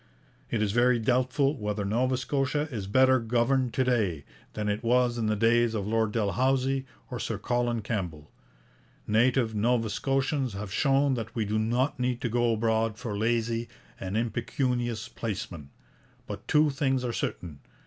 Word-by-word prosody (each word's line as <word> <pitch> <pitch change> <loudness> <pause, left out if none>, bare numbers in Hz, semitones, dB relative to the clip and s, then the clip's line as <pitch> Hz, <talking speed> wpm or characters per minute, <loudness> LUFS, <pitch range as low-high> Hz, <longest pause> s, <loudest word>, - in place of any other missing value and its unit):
It 110 -2 0
is 105 - 0
very 120 +2 +4
doubtful 130 +4 +1
whether 105 -4 -3
Nova 125 +5 +1
Scotia 140 +3 -1
is 105 -6 -4
better 130 +4 +4
governed 120 +2 +1
to 130 - +3
day 105 - 0 0.3
than 105 -1 -3
it 105 +1 -1
was 120 0 +2
in 110 - 0
the 110 - +1
days 115 +1 +3
of 100 -3 -2
Lord 110 0 +1
Dalhousie 130 +6 +1 0.2
or - - -4
Sir - - -3
Colin 120 -2 -1
Campbell. 85 -9 -4 0.7
Native 115 +1 +2
Nova 115 +1 +1
Scotians 135 +1 0
have 100 0 -6
shown 140 +1 +3
that 115 -2 -4
we 110 -3 0
do 105 +1 0
not 120 +5 0
need 125 -1 0
to 120 - -1
go 120 +1 +2
abroad 110 0 0
for 105 -3 -4
lazy 115 +1 0 0.3
and 95 +2 -3
impecunious 120 0 -1
placemen. 90 -9 -5 0.6
But - - -8
two 150 0 +4
things 135 -2 0
are 120 - -2
certain. 90 - -4
120 Hz, 160 wpm, -28 LUFS, 110-130 Hz, 0.7 s, very